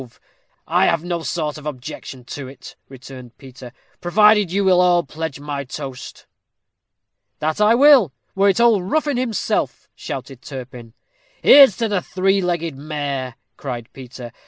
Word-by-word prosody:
said 130 - -10
Zoroaster. - - -30 0.4
"I - - +2
have 165 -1 0
no 175 -1 -3
sort 155 -2 -3
of 150 - -9
objection 130 -1 -8
to 135 +1 -7
it," 135 +1 -12
returned 130 -2 -12
Peter, 130 -2 -12 0.3
"provided 210 +1 +3
you 200 +2 0
will 180 -1 +4
all 175 -1 +3
pledge 155 0 -6
my 145 -1 -5
toast." 135 -1 -9 1.1
"That 155 +5 -2
I 215 +2 +5
will, 265 - +6 0.2
were 200 +1 +3
it 195 - +1
old 215 -6 +3
Ruffin 295 -2 0
himself," 245 -4 -2
shouted 130 -1 -8
Turpin. 125 -4 -10 0.5
"Here's 275 -9 +8
to 230 - 0
the 200 -4 -1
three 195 +2 0
legged 170 -4 -2
mare," 140 -3 -5 0.2
cried 120 -4 -6
Peter. 125 -3 -10
155 Hz, 155 wpm, -20 LUFS, 130-195 Hz, 1.1 s, Here's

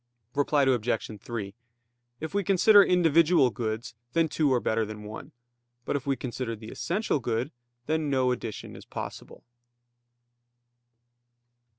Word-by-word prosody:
Reply 145 0 +2
Obj. 120 -4 0
3: 105 -5 -5 0.7
If 160 +2 -5
we 200 0 +1
consider 200 +2 +6
individual 165 -6 +4
goods, 110 +1 -4 0.2
then 165 -1 +2
two 150 -3 +1
are 125 - +3
better 110 -1 0
than 105 0 -7
one. 105 +1 -8 0.5
But - - -1
if 140 -1 -3
we 135 - +2
consider 125 -2 -4
the 110 +1 -10
essential 185 -3 -1
good, 120 +3 -2 0.3
then 155 0 0
no 130 -2 +2
addition 115 -3 -5
is - - -11
possible. - - -8
130 Hz, 130 wpm, -27 LUFS, 115-160 Hz, 0.7 s, consider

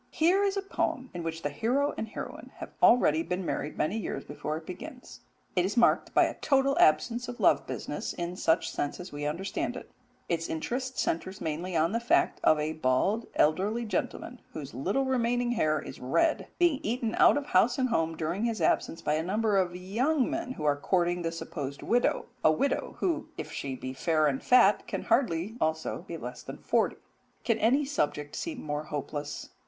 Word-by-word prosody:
Here 360 +5 +3
is 400 0 +1
a 395 - -1
poem 260 -9 -2
in 175 - -4
which 165 0 -4
the 145 - -1
hero 255 - +1
and 220 - -4
heroine 220 - -7
have - - -8
already 160 -10 +5
been 180 +2 -3
married 150 - -3
many 195 +9 0
years - - -4
before 150 +1 -4
it 160 - -10
begins: 215 +8 -9 0.4
it 180 - +3
is 200 +5 -2
marked 235 - +4
by - - +7
a - - 0
total 275 0 +2
absence 230 +11 +3
of 245 0 -7
love - - +3
business - - -4
in 175 +1 -4
such 165 -2 +1
sense 145 - -3
as 180 +1 -8
we 145 0 -3
understand 175 +7 -2
it: - - -9 0.4
its 165 -1 -1
interest 255 +11 -3
centres 185 +4 -1
mainly 170 +3 -3
in 165 +2 +3
the 230 - 0
fact 235 - +2
of 155 - +5
a 155 +1 -1
bald 155 - +1
elderly 200 +10 +2
gentleman, 225 +4 -3
whose 145 -3 -7
little 195 - 0
remaining 245 -1 +1
hair 155 -10 +1
is - - -9
red, 225 - +1
being 345 -6 +3
eaten 230 0 -1
out - - +7
of 290 - -2
house 210 +4 +3
and 255 -1 +1
home 165 -7 0
during 175 +7 -1
his 230 -2 -1
absence 165 - +1
by 150 - +1
a 155 - +1
number 210 +4 0
of 180 -2 +1
young 240 - +1
men 255 - -3
who 155 - -7
are 145 -1 +4
courting 175 +3 +1
the 165 -1 -1
supposed 145 -4 -6
widow 240 +1 +1 0.2
a - - +6
widow 275 - -1
who, 330 -3 0
if - - -6
she 135 -2 -4
be 130 0 -6
fair 155 +3 +1
and 135 -3 +1
fat, 210 -5 +5
can - - -3
hardly 225 -4 +1
also 160 0 -1
be - - -5
less - - -7
than - - -8
forty. - - +1 0.5
Can 230 -2 +1
any 265 +7 +3
subject 150 - -2
seem 315 -6 -4
more 150 0 -3
hopeless? 145 0 -5
185 Hz, 200 wpm, -29 LUFS, 155-245 Hz, 0.5 s, by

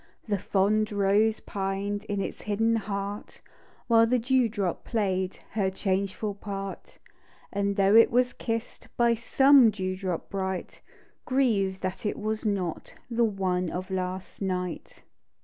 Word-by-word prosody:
The 205 -2 0
fond 210 +3 +1
rose 205 +2 +2
pined 200 +1 -3
In 205 -2 -2
its - - -5
hidden 225 +2 +1
heart 200 -1 -4 0.5
While 230 -1 +5
the 250 +2 +3
dew 250 0 +2
drop 200 -6 -2
play'd 190 -4 -1
Her 195 -3 +1
changeful 195 +2 -2
part. 195 -1 -7 0.6
And 200 0 0
though 195 +1 +4
it 230 - +8
was 250 +1 +2
kiss'd 230 0 -4
By 235 -1 +4
some 265 +2 +5
dew 185 -3 -3
drop 185 -3 -3
bright, 190 -1 -4 0.5
Griev'd 210 -8 +1
that 185 0 -4
it - - -2
was 215 +1 -2
not 185 -5 -3 0.2
The 235 0 +3
one 185 -4 -1
of 185 +3 -5
last 185 +1 -4
night. 180 -2 -4
200 Hz, 140 wpm, -27 LUFS, 190-225 Hz, 0.6 s, it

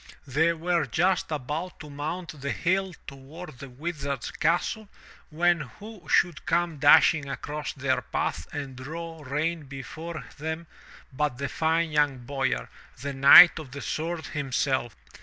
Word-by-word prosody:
They 155 +5 +2
were 170 -1 0
just 180 +7 +1
about 155 +5 -4
to 150 - -9
mount 155 +1 -5
the 140 - -3
hill 185 0 0
toward 140 +2 -10
the 140 - -9
Wizard's 140 -1 -4
castle, 175 +6 0 0.4
when 170 +2 +2
who 200 - -10
should 170 -5 +2
come 170 -3 0
dashing 145 0 +6
across 145 +1 -5
their 135 -1 0
path 80 - -3
and 140 -3 -5
draw 160 +5 -7
rein 150 +3 -2
before 140 +2 -7
them 160 +2 -4 0.5
but 145 -2 -1
that 140 +1 -3
fine 160 0 +1
young 145 -3 +2
boyar, 135 - -1 0.3
the 140 +2 -4
Knight 140 +6 +9
of 155 -4 -9
the 140 - -6
Sword 160 0 -3
himself. 130 -4 -1
150 Hz, 140 wpm, -27 LUFS, 140-170 Hz, 0.5 s, Knight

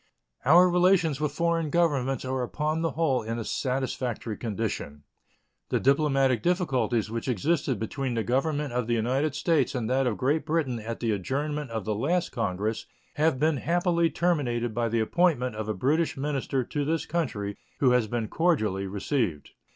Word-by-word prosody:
Our 175 +6 +7
relations 175 -4 +3
with 150 - 0
foreign 170 -2 0
governments 140 -6 +1
are 130 0 -1
upon 150 +5 -1
the 165 -2 -1
whole 150 -5 +1
in 115 +1 -4
a 115 - -3
satisfactory 125 -4 -2
condition. 100 -10 -4 0.7
The - - +1
diplomatic 135 -3 +2
difficulties 125 - 0
which 115 +2 -4
existed 130 - 0
between 125 +4 -3
the 115 - 0
Government 145 +2 0
of 125 -2 -1
the 120 - +1
United 130 +6 0
States 150 -4 +1
and 120 -3 -1
that 130 0 +2
of 110 - -1
Great 145 +4 +1
Britain 150 -6 -1
at 115 +1 -6
the 115 -2 +1
adjournment 145 +8 -2
of 110 -3 -4
the 110 - 0
last 165 +11 0
Congress 110 0 -2 0.3
have 150 -3 +2
been 155 0 +2
happily 170 +2 +1
terminated 125 -11 0
by 115 +1 0
the 115 0 +1
appointment 125 -3 +1
of 110 0 -4
a - - +1
British 155 - +1
minister 135 -2 -1
to 145 +4 -3
this 160 +1 -1
country, 110 -12 -2 0.2
who 130 -3 +4
has 125 -3 +3
been 115 0 -2
cordially 110 - +1
received. 100 - -2
130 Hz, 170 wpm, -27 LUFS, 115-155 Hz, 0.7 s, Our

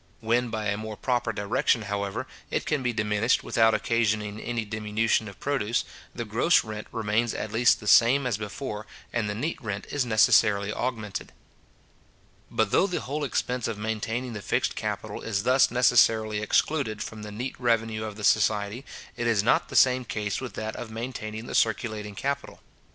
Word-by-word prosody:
When 120 +2 +1
by 110 -1 -3
a 100 0 0
more 110 -1 -6
proper 120 -3 0
direction, 110 +3 +1
however, 100 -1 -3 0.2
it - - -1
can 150 -3 0
be 125 -1 0
diminished 105 +1 +1
without 110 -1 +3
occasioning 110 -2 0
any 120 -1 -3
diminution 110 +1 0
of 100 - -11
produce, 120 -5 0 0.3
the 120 - -4
gross 115 +11 +3
rent 105 -1 -7
remains 110 +1 0
at 105 - -4
least 120 +2 +4
the 105 - -11
same 120 +6 +5
as 125 -4 +1
before, 105 +1 -5 0.3
and 115 -3 0
the 105 - -3
neat 145 +9 -3
rent 105 -4 -4
is 145 -2 +1
necessarily 105 -3 +4
augmented. 110 -6 -4 1.2
But 110 -2 0
though 195 - +4
the 180 - -2
whole 145 +4 -3
expense 125 -3 -1
of 115 -2 -3
maintaining 110 +3 -3
the 105 - -6
fixed - - 0
capital - - -4
is 100 -3 -2
thus 130 +2 +4
necessarily 115 -3 +3
excluded 110 0 0
from 110 -1 -8
the 105 0 -7
neat 125 +6 -4
revenue 115 -3 +1
of 105 -1 -5
the 105 - -9
society, 105 +3 +2 0.3
it 120 -1 -2
is 110 -4 +2
not - - +2
the - - -7
same 130 0 +5
case 105 -2 -3
with 130 - -6
that 110 0 -4
of 120 - -6
maintaining 110 -1 -5
the - - -7
circulating 105 -1 0
capital. 140 +4 -3
110 Hz, 180 wpm, -27 LUFS, 105-120 Hz, 1.2 s, same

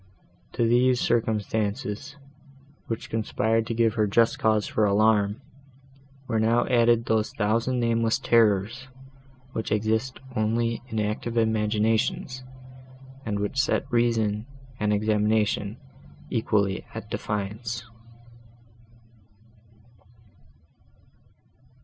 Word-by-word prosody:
To 115 - +1
these 125 +1 +3
circumstances, 110 +4 -1 0.7
which 115 - -5
conspired 110 0 0
to 115 - -2
give 115 -1 +2
her 110 -2 +1
just 115 +3 +2
cause 110 -1 +2
for 110 - 0
alarm, 105 0 +3 0.9
were 115 -2 0
now 115 +2 +3
added 115 -1 +3
those 110 -1 +1
thousand 115 +4 +1
nameless 115 -1 +1
terrors, 115 +2 +2 0.6
which 110 - -4
exist 110 +4 0 0.2
only 115 +1 0
in 110 -3 -3
active 110 +3 -2
imaginations, 110 +3 0 0.8
and 105 -2 -1
which 105 +6 0
set 140 - 0
reason 115 -2 +1 0.3
and 105 0 +1
examination 105 0 +1 0.5
equally 100 -4 0
at - - -7
defiance. 105 +3 -4
110 Hz, 95 wpm, -26 LUFS, 105-115 Hz, 0.9 s, these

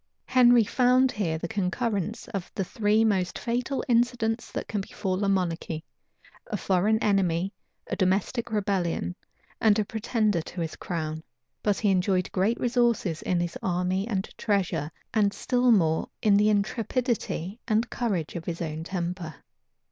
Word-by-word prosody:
Henry 245 -2 +6
found 255 +3 +3
here 170 -7 -1
the 165 - -4
concurrence 205 +2 -2
of 195 -3 -4
the 195 - 0
three 215 +2 +2
most 190 -4 +1
fatal 245 +3 -2
incidents 235 -1 +1
that - - -4
can 205 - -2
befall 190 0 -3
a 200 - +2
monarchy; 170 -4 -1 0.6
a 210 - -2
foreign 200 +4 +2
enemy, 190 -2 +1 0.3
a - - -3
domestic 200 +6 0
rebellion, 190 - -1 0.5
and 215 -1 +5
a 215 - +1
pretender 215 -3 0
to 175 +2 -6
his 165 -1 -3
crown; 160 -2 -4 0.4
but 205 -2 +1
he 205 -3 +2
enjoyed 185 -1 +1
great 200 +5 +1
resources 235 -9 +1
in 180 - 0
his 175 -1 -2
army 185 +2 0
and 195 -4 -2
treasure, 195 -8 0 0.2
and 205 -2 +2
still 250 -1 +2
more 160 -7 +3
in 210 -2 +5
the 210 +1 +4
intrepidity 215 - -1
and 225 +1 +1
courage 195 -11 -2
of 170 -1 -5
his 170 -1 -4
own 160 -1 -4
temper. 175 -3 -4
200 Hz, 150 wpm, -27 LUFS, 180-225 Hz, 0.6 s, Henry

